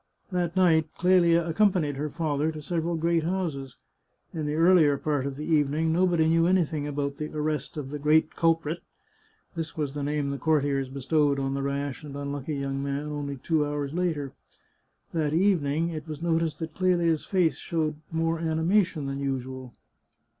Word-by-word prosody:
That 175 -1 -1
night 160 -4 +4
Clelia 170 -2 +4
accompanied 170 -5 +2
her 150 +2 -3
father 155 -1 -1
to 155 - -7
several 170 +1 -1
great 165 +1 +1
houses. 160 -7 -3 0.6
In 155 -2 -3
the 150 - -1
earlier 165 -4 +5
part 145 -2 -1
of 140 - -4
the 150 +2 -6
evening 155 +1 +2
nobody 170 -2 +3
knew 165 +1 +3
anything 160 -5 +1
about 140 -1 -3
the 150 +1 -4
arrest 150 0 -2
of 140 -2 -5
the 150 - -4
great 155 +2 +3
culprit 165 0 +1 0.4
— 440 - -36
this 165 -1 -5
was 145 -3 -2
the 145 - -4
name 145 0 -1
the 140 - -4
courtiers 140 -2 +1
bestowed 140 +2 +1
on 135 0 -1
the 140 - -2
rash 140 +1 -3
and 140 -2 -7
un 140 0 -4
lucky 145 +1 -4
young 135 0 -2
man 140 +1 -2
only 145 -2 -4
two 155 +3 +1
hours 145 -1 -3
later. 160 -6 -1 0.8
That 155 -3 0
evening 165 -4 +2
it 155 -2 -6
was 155 -2 -6
noticed 165 -2 0
that 160 -1 -6
Clelia's 175 -3 +1
face 175 -8 +1
showed 155 -2 -2
more 165 0 0
animation 165 0 +1
than 135 0 -3
usual. 130 -2 -4
155 Hz, 175 wpm, -27 LUFS, 140-165 Hz, 0.8 s, earlier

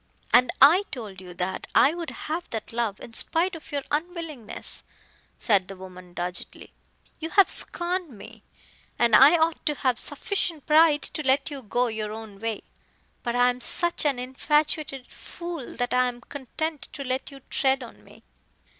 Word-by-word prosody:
"And 250 - +6
I 315 +8 +8
told 210 -7 -7
you 180 -1 -11
that 180 +1 -3
I 285 - +6
would 340 -2 -5
have 330 +3 -5
that 225 0 -5
love 230 -4 -1
in 230 - -10
spite 345 +8 +1
of 325 - -11
your 285 -1 -2
unwillingness," 310 - -3 0.5
said 200 -5 +2
the 195 - -8
woman 185 -1 -12
doggedly. 180 +1 -4 0.5
"You 320 - -4
have 395 +2 +5
scorned 350 0 0
me, 215 -7 -13 0.6
and 235 -2 +4
I 285 +8 +8
ought 320 0 +1
to 300 - +2
have 255 -3 0
sufficient 340 -7 -2
pride 310 -1 +5
to 310 - -4
let 275 +1 +2
you 280 -2 -6
go 245 +2 0
your 215 -2 -3
own 220 -3 -9
way. 225 -1 -3 0.6
But 240 0 -2
I 245 0 +5
am 250 0 -9
such 345 +7 +2
an 285 -4 +1
infatuated 275 +1 0
fool 340 -7 -7
that 245 0 -1
I 250 0 +4
am 245 0 -6
content 285 +2 -5
to 280 - -5
let 260 0 -2
you 275 -1 -13
tread 265 -1 +1
on 235 - -13
me." - - -18
265 Hz, 170 wpm, -26 LUFS, 230-315 Hz, 0.6 s, I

